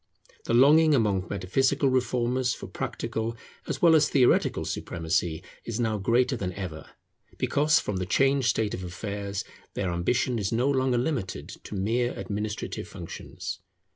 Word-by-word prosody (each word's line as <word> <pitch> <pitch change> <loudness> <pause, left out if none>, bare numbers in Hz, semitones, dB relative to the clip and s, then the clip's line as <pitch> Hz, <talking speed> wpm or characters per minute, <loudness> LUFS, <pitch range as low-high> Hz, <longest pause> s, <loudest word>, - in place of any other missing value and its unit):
The 115 - +1
longing 150 +4 +6
among 100 -6 +1
metaphysical 130 +9 +1
reformers 125 -1 +1
for - - -8
practical 115 +1 -4 0.3
as - - -4
well 170 -1 +7
as 155 - +4
theoretical 130 -3 +3
supremacy 80 0 -2 0.2
is 115 0 -4
now 110 -3 0
greater 120 +6 +2
than 95 -6 -3
ever; 85 -5 -7 0.5
because, 150 +2 +3
from 105 - -3
the 90 0 -3
changed 135 +4 +3
state 110 -2 +1
of 90 - -4
affairs, 100 +2 -4 0.3
their 95 -3 -1
ambition 120 +8 0
is 100 -2 -1
no 125 +5 +2
longer 130 -2 +2
limited 120 - -2
to - - -9
mere 115 +6 0
administrative 105 0 -4
functions. 90 +2 -7
115 Hz, 145 wpm, -27 LUFS, 95-130 Hz, 0.5 s, well